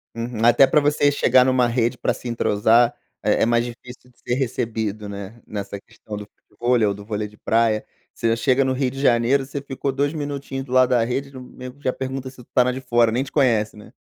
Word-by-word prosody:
Uhum. 115 Hz, -1 st, -2 dB
Até 120 Hz, +3 st, +6 dB
pra 150 Hz, -, +4 dB
você 145 Hz, 0 st, +2 dB
chegar 130 Hz, -2 st, +4 dB
numa 130 Hz, -1 st, +3 dB
rede 120 Hz, +1 st, 0 dB
pra -, -, 0 dB
se -, -, -9 dB
entrosar 115 Hz, +1 st, +3 dB, 0.3 s
é -, -, +2 dB
é -, -, +4 dB
mais 120 Hz, 0 st, +2 dB
difícil 125 Hz, +1 st, -11 dB
de 120 Hz, -, -36 dB
ser 120 Hz, -, -2 dB
recebido, 110 Hz, -5 st, -3 dB
né. 100 Hz, +3 st, -8 dB
Nessa 100 Hz, -1 st, -5 dB
questão 110 Hz, 0 st, -11 dB
do 105 Hz, -, -8 dB
futevôlei 120 Hz, +2 st, 0 dB
ou 100 Hz, -, 0 dB
do 100 Hz, +1 st, -10 dB
vôlei 105 Hz, -1 st, -3 dB
de 105 Hz, 0 st, -19 dB
praia. 110 Hz, -1 st, +1 dB, 0.3 s
Você 115 Hz, 0 st, 0 dB
chega 130 Hz, +2 st, +2 dB
no 130 Hz, 0 st, 0 dB
Rio 130 Hz, -1 st, -1 dB
de 135 Hz, -, -8 dB
Janeiro, 125 Hz, +1 st, +3 dB
você 140 Hz, +1 st, -5 dB
ficou 140 Hz, 0 st, -3 dB
2 140 Hz, +3 st, -1 dB
minutinhos 140 Hz, -3 st, -5 dB
do 125 Hz, -, -13 dB
lado 130 Hz, 0 st, +4 dB
da 120 Hz, -2 st, +3 dB
rede, 135 Hz, +4 st, -3 dB
no 130 Hz, -, -9 dB
nego 125 Hz, +2 st, -11 dB
já 130 Hz, -, 0 dB
pergunta 130 Hz, 0 st, -5 dB
se 130 Hz, -, -16 dB
tu -, -, -28 dB
está 125 Hz, -, +3 dB
na 125 Hz, -, 0 dB
de 130 Hz, -, -5 dB
fora, 120 Hz, -3 st, +2 dB
nem 125 Hz, +4 st, 0 dB
te 135 Hz, -, -11 dB
conhece, 115 Hz, -7 st, +2 dB
né. 105 Hz, -, -14 dB
125 Hz, 235 wpm, -22 LUFS, 115-130 Hz, 0.3 s, Até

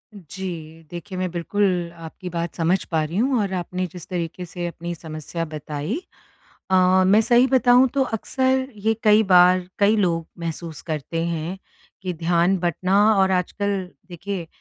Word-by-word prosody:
जी। 165 Hz, -3 st, -8 dB
देखिए, 185 Hz, +2 st, -7 dB
मैं 185 Hz, -1 st, -1 dB
बिल्कुल 175 Hz, 0 st, 0 dB
आपकी 165 Hz, +2 st, -8 dB
बात 170 Hz, 0 st, -4 dB
समझ 175 Hz, +3 st, +1 dB
पा 160 Hz, -1 st, +2 dB
रही 165 Hz, +5 st, -4 dB
हूँ 255 Hz, +1 st, +2 dB
और 195 Hz, -2 st, -2 dB
आपने 185 Hz, 0 st, -2 dB
जिस 175 Hz, 0 st, -11 dB
तरीक़े 175 Hz, 0 st, -4 dB
से 175 Hz, +1 st, -6 dB
अपनी 170 Hz, 0 st, -5 dB
समस्या 160 Hz, +1 st, -5 dB
बताई 155 Hz, -, -4 dB, 0.7 s
अ, -, -, +3 dB, 0.3 s
मैं 205 Hz, +3 st, +6 dB
सही 240 Hz, +3 st, +4 dB
बताऊँ 255 Hz, -1 st, +5 dB
तो 275 Hz, -, +3 dB
अक्सर 260 Hz, +3 st, 0 dB
ये 220 Hz, +2 st, +1 dB
कई 215 Hz, +1 st, +6 dB
बार, 180 Hz, -2 st, +5 dB
कई 210 Hz, +2 st, +4 dB
लोग 170 Hz, -5 st, +1 dB
महसूस 165 Hz, -1 st, -5 dB
करते 160 Hz, +1 st, -3 dB
हैं 170 Hz, +2 st, -3 dB, 0.4 s
कि 185 Hz, -1 st, -2 dB
ध्यान 170 Hz, +3 st, +2 dB
बटना 180 Hz, +2 st, 0 dB, 0.2 s
और 190 Hz, -1 st, +3 dB
आजकल 190 Hz, +1 st, -1 dB, 0.2 s
देखिए 180 Hz, 0 st, -5 dB
180 Hz, 155 wpm, -23 LUFS, 165-200 Hz, 0.7 s, मैं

